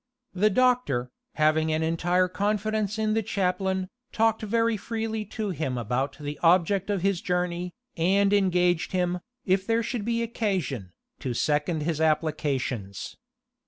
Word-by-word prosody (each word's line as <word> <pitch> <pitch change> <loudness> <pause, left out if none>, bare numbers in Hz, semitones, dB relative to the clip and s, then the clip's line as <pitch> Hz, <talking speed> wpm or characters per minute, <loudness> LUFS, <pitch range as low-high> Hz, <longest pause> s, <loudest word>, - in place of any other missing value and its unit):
The 200 +3 +3
doctor, 215 - +2 0.2
having 155 +1 +3
an 155 +1 +1
entire 175 +3 +2
confidence 210 +2 -1
in 215 -1 +1
the 225 - +2
chaplain, 190 -2 -1 0.2
talked 225 0 +2
very 230 +1 +1
freely 220 0 -3
to 210 0 -3
him 135 -7 -2
about 125 +4 -2
the 145 0 -5
object 185 +3 +3
of 200 -3 0
his 195 -2 +1
journey, 180 -2 -2 0.2
and 195 +4 +3
engaged 180 -4 +2
him, 180 -1 0 0.3
if 190 0 +1
there 230 0 +2
should 235 -2 -3
be 230 +1 0
occasion, 185 - -2 0.3
to 125 -2 -3
second 150 +4 +1
his 160 -1 -1
applications. 140 - -1
185 Hz, 140 wpm, -26 LUFS, 155-215 Hz, 0.3 s, The